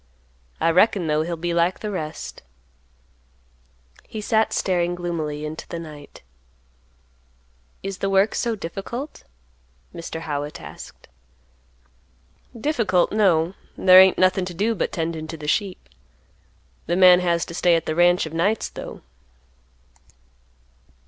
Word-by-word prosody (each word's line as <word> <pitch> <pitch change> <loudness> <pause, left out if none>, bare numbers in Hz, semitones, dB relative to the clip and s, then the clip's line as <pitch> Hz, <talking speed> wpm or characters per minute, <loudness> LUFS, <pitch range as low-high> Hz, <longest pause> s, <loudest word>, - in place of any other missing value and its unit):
I 165 - +3
reckon, 185 +1 +3
though, 155 0 +1
he'll 170 +2 -3
be 170 +1 -2
like 170 +2 +1
the 210 - -4
rest." 155 -5 -6 1.7
He 220 - -7
sat 220 +1 +1
staring 175 -2 0
gloomily 160 -4 -4
into 155 +1 -7
the 170 - -6
night. 150 - -11 1.6
"Is 195 -1 -5
the 195 - -1
work 195 +2 +3
so 235 -2 -1
difficult?" 215 - -6 0.7
Mr. 165 -1 -6
Howitt 150 -1 -4
asked. - - -12 1.5
"Difficult, 220 - +1
no; 185 -5 +2 0.2
there 185 0 +8
ain't 190 -1 +5
nothing 185 0 +3
to 180 -2 -7
do 215 +6 +1
but 205 - -2
tendin' 160 -1 -3
to 165 - -7
the 150 -1 -8
sheep. 190 +3 -1 1.0
The 175 - +1
man 180 -1 +7
has 170 -2 0
to - - -9
stay 175 0 +3
at 165 - -1
the 155 - -1
ranch 175 +1 +3
of 160 - -8
nights, 195 +7 0
though." - - -9
175 Hz, 130 wpm, -23 LUFS, 165-195 Hz, 1.7 s, there